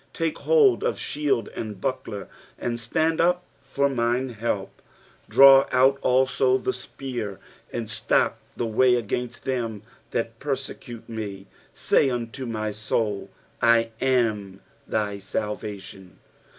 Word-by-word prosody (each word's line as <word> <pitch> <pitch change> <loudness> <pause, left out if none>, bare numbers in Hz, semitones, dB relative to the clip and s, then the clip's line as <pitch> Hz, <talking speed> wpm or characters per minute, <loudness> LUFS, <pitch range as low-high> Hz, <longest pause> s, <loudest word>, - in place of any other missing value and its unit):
2 165 - -1
Take - - -11
hold 440 -5 +4
of 480 - 0
shield 145 -7 -1
and 105 -4 -6
buckler, - - -3 0.3
and 120 -1 -3
stand 160 +7 +1
up 180 +1 +2 0.2
for 140 +1 0
mine 125 0 0
help. 110 -4 -3 0.5
3 - - -15
Draw 135 0 +9
out 135 +2 +4
also 130 0 +3
the 130 0 -2
spear, 125 -5 -6 0.3
and 115 -2 -3
stop 110 - +1 0.2
the 120 - -1
way 125 +3 +4
against 120 +1 -3
them 115 -6 -2 0.3
that 115 0 -3
persecute 135 -4 -5
me: 105 -4 -6 0.3
say 135 - +3
unto 120 +1 -4
my 110 -2 -2
soul, 105 -1 -2 0.3
I 115 -1 +4
am 110 -7 +1 0.3
thy 105 -2 -1
salvation. 95 -2 -5
120 Hz, 130 wpm, -25 LUFS, 110-135 Hz, 0.5 s, Draw